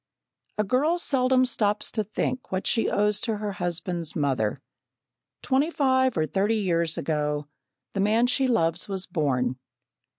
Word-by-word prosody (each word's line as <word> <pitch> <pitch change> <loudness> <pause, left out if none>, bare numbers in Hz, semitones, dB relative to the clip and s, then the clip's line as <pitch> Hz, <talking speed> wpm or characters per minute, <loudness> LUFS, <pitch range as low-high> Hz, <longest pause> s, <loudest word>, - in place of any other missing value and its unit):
A 210 - +2
girl 275 - +2
seldom 255 -5 +2
stops 210 -4 0
to 215 - -1
think 250 +5 -3
what 185 0 -2
she 225 - +2
owes 210 0 +1
to 225 -2 -1
her 210 0 -3
husband's 175 -2 -3
mother. 130 -8 0 0.9
Twenty 275 +4 +2
five 260 - +2
or 155 - +2
thirty 200 +7 +1
years 170 -5 0
ago, 150 -1 -1 0.5
the - - -3
man 215 +4 +3
she 260 +2 +1
loves 175 -7 +1
was 190 -1 -1
born. 130 -6 0
205 Hz, 145 wpm, -26 LUFS, 165-250 Hz, 0.9 s, man